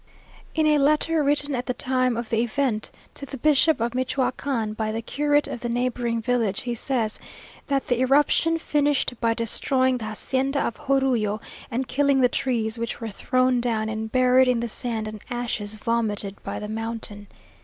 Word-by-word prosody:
In 315 -1 +2
a 300 -1 +4
letter 305 +2 +3
written 285 0 +1
at 250 -1 -3
the 250 - -1
time 255 -2 +1
of 235 -1 -4
the 225 - +2
event 235 -2 -1 0.2
to - - -7
the 275 0 -6
bishop 305 +2 +4
of 230 +1 0
Michioacán 255 -3 -1
by 215 0 -2
the 225 +1 -3
curate 290 +4 +1
of - - -5
the 240 - -4
neighbouring 240 -1 -1
village, 230 -5 0
he 245 -1 -3
says, 235 -2 -1 0.5
that 275 -1 0
the 245 0 0
eruption 295 +5 +3
finished 290 -4 +1
by 230 -1 +2
destroying 255 +3 +1
the 220 - -5
hacienda 265 +6 -1
of 235 - -3
Jorullo, 250 -6 +2 0.3
and 250 +2 -2
killing 280 0 +2
the 250 -1 +5
trees, 230 -4 -1
which 230 0 -3
were 225 -1 -4
thrown 255 +3 +1
down 220 -2 0
and 220 0 -4
buried 255 0 +5
in 250 -2 +2
the 235 0 -2
sand 225 -2 -3
and 215 -1 -7
ashes 230 -4 -3
vomited 210 -3 -1
by - - -4
the 210 - -5
mountain. 220 -2 -5
245 Hz, 180 wpm, -24 LUFS, 225-270 Hz, 0.5 s, the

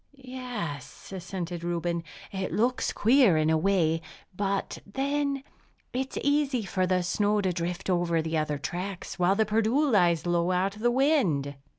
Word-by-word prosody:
"Yes," 245 - -6
assented 175 -2 -5
Reuben, 170 0 -1 0.3
"it 190 -1 -3
looks 245 +3 +1
queer 230 - +4
in 155 0 +2
a 160 - +4
way. 165 -3 +2 0.3
But 200 0 -2
then, 275 +4 -1 0.5
it's 260 +1 -3
easy 285 -4 +2
for 185 -1 0
the 180 0 +1
snow 205 +3 +1
to 185 -2 0
drift 175 +2 -3
over 175 -2 +1
the 160 0 -2
other 155 -2 0
tracks; 180 +3 -5
while 180 +2 +3
the 220 +1 +3
Perdu 220 +5 +2
lies 175 -6 +3
low 175 0 +1
out 185 +2 +1
of 215 - -11
the 240 - +3
wind." 240 - +2
190 Hz, 160 wpm, -28 LUFS, 170-240 Hz, 0.5 s, queer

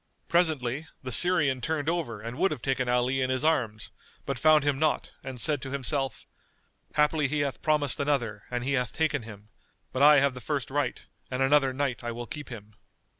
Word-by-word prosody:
Presently 155 -4 +1 0.2
the 130 - -5
Syrian 145 -3 +4
turned 155 -1 -2
over 160 -11 -2
and 115 +2 -6
would 190 +2 +3
have 145 -6 -6
taken 130 -2 0
Ali 125 +2 +1
in 130 - 0
his 130 +3 0
arms, 115 -9 0 0.3
but 135 -3 -3
found 155 0 +5
him 140 -2 0
not 155 -1 0
and 130 -2 -6
said 145 +3 +1
to 135 - -6
himself, 135 -1 -2 0.7
"Haply 150 -1 +2
he 145 +2 -1
hath 140 -5 -3
promised 150 -3 +1
another 125 -8 -1
and 120 -1 -3
he 140 +2 -1
hath 125 -2 0
taken 155 -4 0
him; 105 -2 -12 0.4
but 130 - -1
I 150 +1 +8
have 140 -1 +2
the 125 - -9
first 140 +1 -3
right 145 +1 -1 0.3
and 130 +1 0
another 135 0 +4
night 130 -2 -2
I 120 0 -3
will 120 +1 -6
keep 150 0 -7
him." 105 -3 -10
135 Hz, 200 wpm, -27 LUFS, 125-150 Hz, 0.7 s, I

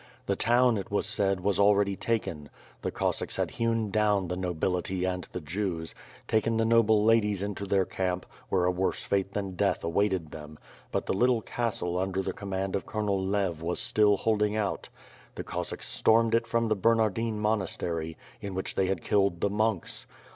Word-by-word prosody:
The - - 0
town, 120 0 +3
it 95 - -5
was 100 - 0
said, 95 -2 0
was 100 0 +1
already 100 -1 +4
taken. 90 -10 -2 0.3
The - - -1
Cossacks - - -2
had - - -1
hewn 115 -2 0
down 105 -3 +2
the 90 - -1
nobility 90 +1 -1
and 90 -1 -2
the 90 - -7
Jews; 80 0 -3 0.3
tak^n 110 +1 +1
the 115 - +2
noble 110 -2 +4
ladies 105 -3 +3
into 100 0 -4
their 95 -1 +2
camp, 90 -1 -2 0.2
where 90 -2 +2
a 90 - +3
worse 90 +1 -1
fate 100 0 -1
than 100 -2 -3
death - - +1
awaited 90 -1 0
them; 75 0 -9 0.3
but - - -1
the - - 0
little 120 +2 +2
castle 95 -7 -2
under 95 0 -1
the - - -3
command 95 -1 -3
of 100 - -3
Colonel 100 -3 -1
Lev 95 -4 -1
was 85 +1 -2
still 105 -1 +3
holding 105 0 +1
out. 105 -3 -2 0.5
The - - -5
Cossacks - - -5
stormed 115 0 +3
it 115 0 +2
from 115 0 +1
the 110 - +2
Ber 115 +4 +3
nardine 110 0 0
monastery, 85 -6 -1 0.2
in 100 -2 -5
which 95 - -2
they 95 - +1
had 95 -3 -2
killed 100 -4 +2
the 100 - 0
monks. 110 -3 -1
100 Hz, 185 wpm, -28 LUFS, 90-110 Hz, 0.5 s, already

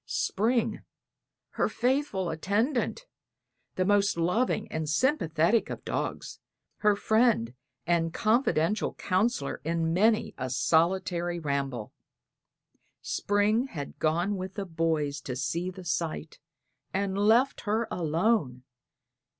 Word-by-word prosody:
Spring 230 +4 0 0.7
her - - 0
faithful 250 - 0
attendant, 225 - -1 0.7
the 185 - +1
most 205 0 +3
loving 215 +6 +1
and 160 -1 -3
sympathetic 170 - +2
of - - -7
dogs, - - -4 0.4
her 210 -1 +3
friend 220 - +2 0.3
and 165 -1 +1
confidential 215 - +1
counselor 185 -6 0
in 165 +1 0
many 215 +5 +2
a 130 0 -2
solitary 170 +6 +1
ramble 140 -7 -3 1.1
Spring 210 +5 +1
had 145 - -7
gone 175 +6 +1
with 185 +1 -6
the 200 -2 -3
boys 160 -4 -1
to 130 -2 -5
see 150 +8 -2
the 185 0 -10
sight, 165 -1 -3 0.5
and 195 0 -1
left 225 +7 +3
her 220 +2 0
alone. 165 - 0
185 Hz, 110 wpm, -28 LUFS, 160-215 Hz, 1.1 s, most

